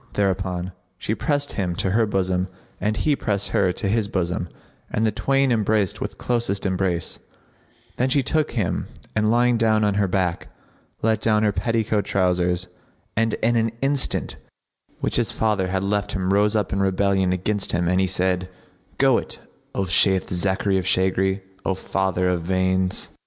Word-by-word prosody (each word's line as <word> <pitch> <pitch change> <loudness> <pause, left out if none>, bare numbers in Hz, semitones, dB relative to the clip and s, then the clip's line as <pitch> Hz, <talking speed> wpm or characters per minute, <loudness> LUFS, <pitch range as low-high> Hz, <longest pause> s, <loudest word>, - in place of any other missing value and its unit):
Thereupon 95 -2 -1 0.3
she 105 - -2
pressed 145 +3 -1
him 90 -4 -2
to 95 - 0
her 110 +2 +3
bosom 95 -2 0 0.3
and 105 +2 -1
he 150 -2 +2
pressed 100 -6 -1
her 95 -2 +2
to 100 - -3
his 105 +1 +1
bosom 90 -3 -2 0.4
and 110 - 0
the 110 - +2
twain 135 +5 +1
embraced 110 -4 +1
with - - -4
closest 120 -5 -1
embrace, 90 -3 -1 0.8
then 130 +2 +1
she 135 +1 +3
took 155 +3 0
him 105 -7 -1 0.3
and, 105 0 +2
lying 120 +1 +3
down 110 -2 +3
on 105 -1 +2
her 100 - +2
back, 90 -2 -1 0.6
let 110 0 +2
down 110 -1 +2
her 105 - +3
petticoat 110 -1 0
trousers, 90 -1 +1 0.5
and 115 0 +1
in 120 +1 +3
an 115 -1 +1
instant 140 -1 0 0.5
that - - -33
which - - 0
his - - +1
father 105 -4 0
had 95 +1 -1
left 100 +1 -1
him 95 -1 0
rose 105 +2 +3
up 105 -3 0
in 100 - 0
rebellion 95 -1 +2
against 100 +2 -1
him 85 0 0
and 90 +2 +2
he 95 - +2
said, 90 0 0 0.5
"Go - - +4
it, - - -7 0.4
O 100 - +1
Shayth 95 +1 +3
Zachary[FN#61] 95 +2 +1
of 90 - -4
shaggery, 95 +1 +1 0.2
O - - +1
father 95 -1 -1
of 90 -2 +1
veins!" 95 +1 0
100 Hz, 175 wpm, -23 LUFS, 95-110 Hz, 0.8 s, Go